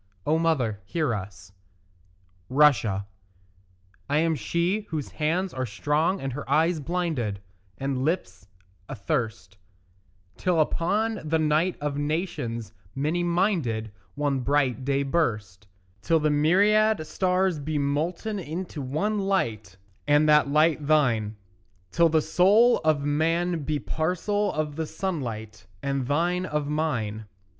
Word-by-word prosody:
O 155 +2 +2
mother, 130 -11 0
hear 150 - -1
us. 95 -2 -7 1.0
RUSSIA 125 -8 +3 1.0
I 145 - +2
am 165 +1 +2
she 175 +7 -1
whose 155 -4 -4
hands 170 +5 -1
are 130 -1 -3
strong 150 - 0
and 135 -1 -4
her 145 +2 -7
eyes 165 +1 +2
blinded 150 - -2 0.4
And 135 -1 -2
lips 100 - -2 0.4
athirst 110 -4 -3 0.8
Till 180 -3 +1
upon 205 +8 0
the 160 +1 +1
night 155 +3 +1
of 145 -1 -2
nations 145 - -3 0.2
many 155 +6 0
minded 170 - 0 0.2
One 145 -2 0
bright 135 -1 +1
day 140 +1 +1
burst: 105 - -2 0.3
Till 165 -1 +2
the 150 0 +1
myriad 200 +6 +3
stars 180 +1 0
be 150 +1 -3
molten 165 +9 -1
into 165 -1 -5
one 175 +11 -1
light, 115 - -1 0.3
And 145 +1 +4
that 150 -1 +5
light 150 0 +2
thine; 120 -9 +2 0.6
Till 170 - +4
the 160 -1 +2
soul 205 +9 +4
of 155 -2 +2
man 165 +4 +1
be 150 +1 -1
parcel 185 +8 -1
of 150 -1 -3
the 160 -1 -2
sunlight, 110 - -5 0.2
And 140 -2 -1
thine 175 +5 0
of 150 -3 -2
mine. 115 -9 -2
150 Hz, 125 wpm, -26 LUFS, 130-170 Hz, 1.0 s, that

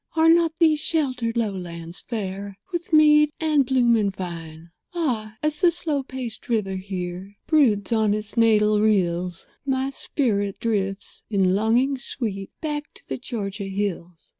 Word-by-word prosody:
Are 325 0 +5
not 335 -1 +4
these 315 -3 +4
sheltered 255 -8 -1
lowlands 175 -6 -4
fair 200 -3 -5
With 345 -1 -4
mead 300 -1 +6
and 300 -4 +2
bloom 245 -3 +4
and 205 -3 +1
vine? 165 -3 -8 0.2
Ah! 225 -10 -2
as 300 0 -1
the 355 - +6
slow 315 -4 -1
paced 260 -4 -7
river 210 -5 0
here 185 0 -5
Broods 240 - +3
on 215 -2 +3
its 215 0 -6
natal 215 -2 +4
rills 180 -4 +1 0.2
My 270 -1 0
spirit 205 -8 -1
drifts, 195 -3 -2
in 190 -3 +2
longing 240 +7 +2
sweet, 205 -7 -4
Back 300 -1 -3
to - - -16
the - - -4
Georgia 205 -5 -4
hills. 190 -4 -4
220 Hz, 145 wpm, -24 LUFS, 195-275 Hz, 0.2 s, mead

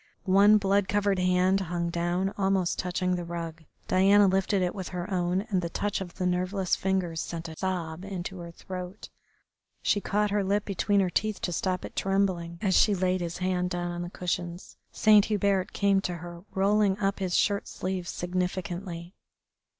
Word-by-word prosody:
One 200 +2 +6
blood 200 -1 +2
covered 200 -1 +1
hand 180 +1 +3
hung 170 -2 -2
down 175 +3 -1
almost 190 -2 +1
touching 180 0 -1
the 175 - -3
rug. 165 -1 -6 0.2
Diana 195 +2 +5
lifted 190 0 +2
it 180 - -1
in 190 - -5
her 180 +2 -5
own, 180 +1 +1
and 185 -2 +2
the 170 - -3
touch 205 +4 -2
of 175 -2 -7
the 185 - -2
nerveless 185 +1 0
fingers 185 -4 -1
sent 165 -1 -5
a 160 - -8
sob 175 -2 -3
into 190 -1 -5
her 170 0 -7
throat. 180 +3 -8 0.7
She 205 - +2
caught 210 +1 0
her 205 -1 +1
lip 200 +2 0
between 200 +1 +1
her 185 -2 0
teeth 215 +2 0
to 175 - -2
stop 185 +1 -1
it - - -10
trembling 185 -3 0
as 190 -2 +2
she 210 - +5
laid 185 0 0
his 170 -1 -4
hand 180 -1 0
down 175 -1 -2
on 175 0 -4
the 175 - -4
cushions. 175 -1 -4 0.2
Saint 210 -2 +5
Hubert 200 -3 +1
came 200 -1 +2
to 180 -2 -3
her, 175 +1 -9
rolling 200 0 +2
up 195 0 -1
his 185 -2 -1
shirt 200 -1 +1
sleeves 185 -2 -4
significantly. 180 -1 -3
185 Hz, 180 wpm, -28 LUFS, 175-195 Hz, 0.7 s, One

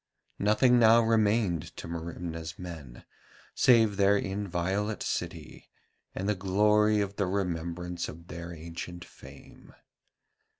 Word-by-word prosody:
Nothing 110 +4 +4
now 115 0 +6
remained 110 -6 +1
to - - -7
Merimna's 85 0 -6
men 80 -10 -9 0.5
save 115 -5 +4
their 100 0 +4
inviolate 100 +1 -2
city 85 -3 -5 0.5
and 95 - -3
the 105 - +2
glory 105 +2 +3
of 100 0 -4
the 100 - 0
remembrance 90 -2 -3
of 85 +2 -11
their 85 0 -7
ancient 85 +1 -8
fame. - - -15
95 Hz, 115 wpm, -29 LUFS, 85-105 Hz, 0.5 s, now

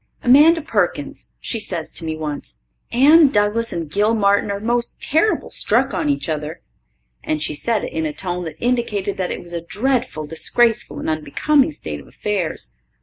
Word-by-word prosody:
Amanda 300 +6 +6
Perkins, - - -2
she 230 - -2
says 175 -7 -4
to - - -6
me 160 -1 -3
once, 145 - -5 0.3
"Anne 295 +6 +7
Douglas 215 0 +1
and 165 -2 -3
Gil 210 +8 +1
Martin 200 -1 +2
are 200 0 -2
most 235 +2 -1
terrible 325 +9 +1
struck - - +1
on 295 - -1
each 280 -8 -1
other." 155 0 -4 0.6
And 155 - -1
she 150 - 0
said 220 +7 -1
it - - -5
in 160 -1 -1
a - - -3
tone 180 +3 -4
that 160 - -6
indicated 235 -5 -1
that 185 -1 -1
it - - -5
was 175 0 -7
a 170 - -3
dreadful 215 - -1
disgraceful 225 +9 +1
and - - -5
unbecoming 160 - +1
state 75 - -6
of 70 - -14
affairs. 195 -6 -3
200 Hz, 180 wpm, -20 LUFS, 160-240 Hz, 0.6 s, Anne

